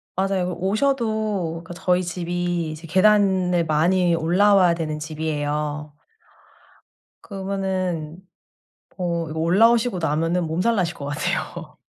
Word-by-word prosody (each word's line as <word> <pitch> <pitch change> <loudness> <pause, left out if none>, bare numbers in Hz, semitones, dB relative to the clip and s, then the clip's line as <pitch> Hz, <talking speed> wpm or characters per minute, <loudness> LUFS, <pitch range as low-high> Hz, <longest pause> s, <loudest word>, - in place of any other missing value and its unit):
맞아요. 190 -1 0
오셔도 215 -5 -1
그 175 - -9
저희 180 +1 +1
집이 175 -1 -2
이제 155 +2 -9
계단을 185 -1 +3
많이 170 +3 +2
올라와야 180 +2 +4
되는 155 -2 -3
집이에요. 150 -1 -3 1.3
그러면은 190 -5 -3 0.8
어 170 -3 -2
이거 155 +1 -4
올라오시고 225 +6 +3
나면은 165 +2 0
몸살나실 180 +2 0
것 140 - -7
같아요. 145 0 -4
175 Hz, 255 characters per minute, -22 LUFS, 160-190 Hz, 1.3 s, 올라와야